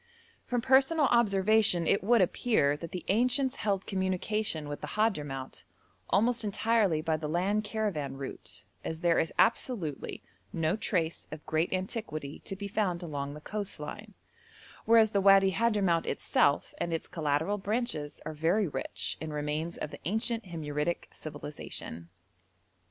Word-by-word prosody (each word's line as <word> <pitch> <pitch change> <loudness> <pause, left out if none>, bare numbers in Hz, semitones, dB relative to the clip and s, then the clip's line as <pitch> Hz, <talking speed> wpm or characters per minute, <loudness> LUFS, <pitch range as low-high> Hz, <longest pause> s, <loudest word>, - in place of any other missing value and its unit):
From 245 -1 0
personal 270 +5 +4
observation 210 -5 +4
it 195 - +2
would 235 +1 +4
appear 180 - +2
that 165 +2 -8
the 180 - -5
ancients 250 +5 +2
held 200 -3 -1
communication 190 -3 -1
with 145 0 -6
the - - -4
Hadhramout 145 - -1 0.5
almost 230 +3 +3
entirely 210 -5 +2
by 160 -1 +1
the 150 -1 -4
land 195 +6 +1
caravan 200 -11 -2
route, 135 -1 -7 0.2
as 160 0 -4
there 170 -1 +3
is 165 - 0
absolutely 220 - 0 0.3
no 165 +2 0
trace 170 -6 -1
of 155 0 -8
great 160 +2 0
antiquity 185 -6 -4
to 195 - -3
be 200 +1 -5
found 190 -4 -1
along 145 -3 -4
the 150 - -10
coast 205 -1 -5
line, 205 +7 -8 0.7
whereas 225 -1 +6
the 200 - +2
Wadi 195 0 +6
Hadhramout 195 -6 +2
itself 140 - +1
and 170 - -1
its 165 - -2
collateral 160 +5 0
branches 200 -8 -2
are - - -4
very 170 +7 +2
rich 135 -3 -3
in 160 -1 -4
remains 150 +3 -2
of 150 - -5
the - - -9
ancient 220 +4 -1
Himyaritic 160 -1 -3
civilisation. 145 - -7
185 Hz, 145 wpm, -30 LUFS, 155-215 Hz, 0.7 s, whereas